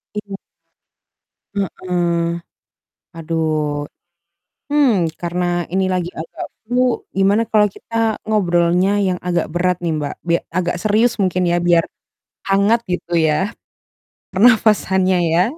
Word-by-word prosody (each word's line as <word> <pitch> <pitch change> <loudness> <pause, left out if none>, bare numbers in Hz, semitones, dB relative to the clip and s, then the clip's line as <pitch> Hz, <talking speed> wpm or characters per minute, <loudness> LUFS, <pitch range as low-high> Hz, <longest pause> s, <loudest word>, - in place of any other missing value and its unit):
Iya. 205 -2 -5 1.2
Heeh. 175 -3 -1 0.8
Aduh, 155 -3 -1 0.9
hmm, 230 - +3
karena 175 +1 -2 0.3
ini 190 +2 +1
lagi 180 -1 -1
agak 160 +1 -6 0.2
flu 250 +1 0
gimana 195 +3 +3
kalau 210 -2 +3
kita 225 +1 -2
ngobrolnya 180 -1 +2
yang 185 -2 0
agak 175 -1 0
berat 180 +1 +1
nih, 165 - 0
Mbak. 145 - -3
Bia 170 0 +2
agak 175 0 -1
serius 220 +2 +2
mungkin 185 -1 +1
ya 175 0 +2
biar 170 -1 +4 0.7
hangat 200 +4 +3
gitu 180 -1 -3
ya 165 +7 +1 0.8
pernapasannya 195 -4 +4
ya. 170 +2 +4
185 Hz, 110 wpm, -19 LUFS, 170-210 Hz, 1.2 s, biar